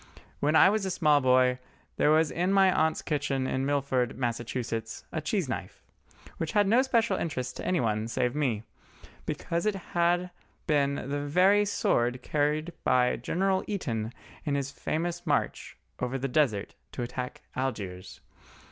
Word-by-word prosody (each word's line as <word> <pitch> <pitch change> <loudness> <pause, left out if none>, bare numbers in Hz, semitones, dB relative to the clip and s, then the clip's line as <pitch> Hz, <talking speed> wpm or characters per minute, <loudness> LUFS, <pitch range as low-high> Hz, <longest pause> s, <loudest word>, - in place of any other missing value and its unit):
When 150 +2 +2
I - - +8
was 215 -1 0
a 190 - -1
small 150 -5 +3
boy, 125 0 +4 0.4
there - - +3
was 155 0 +4
in 180 +3 0
my 195 -1 +5
aunt's 160 0 +1
kitchen 145 -3 -1
in 130 +1 -1
Milford, 135 -5 0
Massachusetts, 120 -2 -3
a 160 - -2
cheese 165 +2 -1
knife, 115 -7 -6 0.5
which 160 - -3
had 205 -1 +4
no 235 +5 +5
special 235 -4 +1
interest 130 -6 -3
to - - -6
anybody 110 -10 0
save 125 +1 0
to 145 - -7
me, 115 -7 0 0.6
because 170 +5 -2
it 210 - +1 0.2
had 175 +1 +2 0.3
been 140 -2 +2
the 140 +1 -3
very 185 +8 +4
sword 125 -10 0
carried 155 +3 0
by 125 -1 +3
General 190 +9 0
Eaton 115 - -2 0.3
in 145 -2 -1
his 140 -1 -2
famous 170 +4 -3
march 145 - -1 0.2
over 125 +1 -1
the 135 +1 -2
Desert 125 -7 +1 0.2
to 125 - -3
attack 125 +1 -5
Algiers. 100 -8 -4
145 Hz, 155 wpm, -28 LUFS, 125-175 Hz, 0.6 s, I